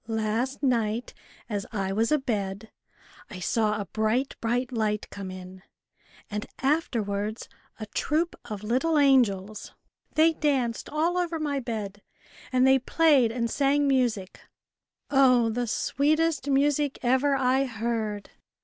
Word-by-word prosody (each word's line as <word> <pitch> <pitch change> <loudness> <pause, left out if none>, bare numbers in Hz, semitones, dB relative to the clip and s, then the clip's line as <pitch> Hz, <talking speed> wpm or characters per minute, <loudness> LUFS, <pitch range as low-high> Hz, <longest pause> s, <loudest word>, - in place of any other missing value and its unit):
" - - -38 0.2
Last 245 +6 -2
night, 235 -3 0 0.3
as 205 -3 -4
I 195 -3 -2
was 225 +5 +1
abed, 215 -7 -2 0.6
I 190 - -8
saw 210 +4 0
a 200 - -3
bright, 220 - -1
bright 245 +2 -1
light 215 -3 -1
come 195 -2 -7
in, 185 0 -10 0.7
and 210 0 -5
afterwards 220 -8 -1 0.3
a 215 - -5
troop 315 +10 -1
of 210 -3 -6
little 265 +9 +1
angels. 215 -8 +2 0.4
They 320 +1 +5
danced 265 -7 -1
all 330 +4 0
over 340 -2 -2
my 290 -2 -1
bed, 215 -5 -5 0.5
and 255 0 +3
they 265 0 +5
played 275 -4 +3
and 235 0 -1
sang 280 +3 +1
music 240 -8 0 0.7
oh! 255 -4 +4
the 245 +2 -2
sweetest 300 +4 0
music 285 +1 +2
ever 260 +3 +3
I 265 +1 +2
heard. 220 -3 -3
245 Hz, 130 wpm, -26 LUFS, 215-275 Hz, 0.7 s, They